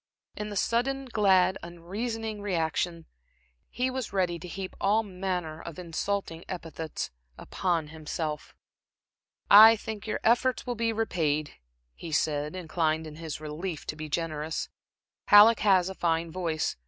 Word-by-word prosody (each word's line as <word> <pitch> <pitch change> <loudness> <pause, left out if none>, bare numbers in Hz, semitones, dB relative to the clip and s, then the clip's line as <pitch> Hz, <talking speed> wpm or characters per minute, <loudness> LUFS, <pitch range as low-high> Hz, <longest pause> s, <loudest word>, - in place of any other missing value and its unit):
In 210 0 -5
the 205 - -6
sudden, 270 +6 0
glad, 190 -6 +3
unreasoning 210 +6 -5
reaction, 170 -3 -1 0.6
he 255 +2 -1
was 255 -2 -4
ready 180 -3 0
to 180 - -8
heap 190 +1 -6
all 215 +3 +3
manner 180 -5 -4
of 170 - -9
insulting 175 0 -3
epithets 165 - -5 0.3
upon 170 -5 -2
himself. 155 -1 -5 1.0
"I 220 +2 +10
think 220 0 -7
your 215 - -2
efforts 245 +1 +2
will 245 - -2
be 230 0 0
repaid," 160 -9 -1 0.4
he 165 - -9
said, 150 +1 0
inclined 160 -2 -1
in 155 -1 -9
his 160 -2 -6
relief 155 +2 -5
to - - -4
be 155 0 -7
generous. 155 0 -3 0.6
"Halleck 210 +2 +8
has 190 -4 +4
a 190 - -4
fine 165 -2 0
voice. 165 -3 -2
180 Hz, 140 wpm, -28 LUFS, 160-210 Hz, 1.0 s, I